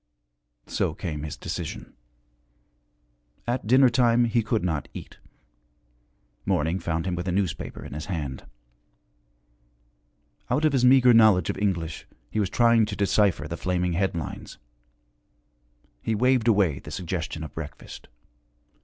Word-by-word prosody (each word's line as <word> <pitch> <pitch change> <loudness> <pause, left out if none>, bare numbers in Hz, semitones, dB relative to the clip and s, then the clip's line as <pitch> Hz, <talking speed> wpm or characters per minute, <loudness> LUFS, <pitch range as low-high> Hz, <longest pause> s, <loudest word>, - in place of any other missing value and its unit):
So - - -1
came 75 -2 -5
his 75 -1 -6
decision. - - -6 1.5
At 120 -2 -2
dinner 130 +3 +6
time 120 0 +3
he 115 0 +1
could 110 -3 -1
not 80 -5 -2
eat. - - -10 1.2
Morning 80 +5 0
found 85 -1 -2
him 95 - -1
with 90 +1 -4
a - - 0
newspaper 90 -6 -3
in - - -8
his 75 +2 -6
hand. 75 -8 -5 2.0
Out 150 - +1
of 155 - +2
his 130 -2 +2
meagre 125 -1 +6
knowledge 110 -7 +5
of - - -8
English 85 -6 -2 0.2
he 110 - -1
was 100 -3 0
trying 115 -2 +4
to 105 - -4
decipher 100 -4 +2
the 85 +2 -5
flaming 90 0 -1
headlines. 85 -2 -3 1.4
He 110 - -1
waved 125 +1 +2
away 100 -11 +3
the - - -11
suggestion 85 -2 -4
of 75 -3 -8
breakfast. 75 -2 -9
95 Hz, 135 wpm, -25 LUFS, 80-115 Hz, 2.0 s, dinner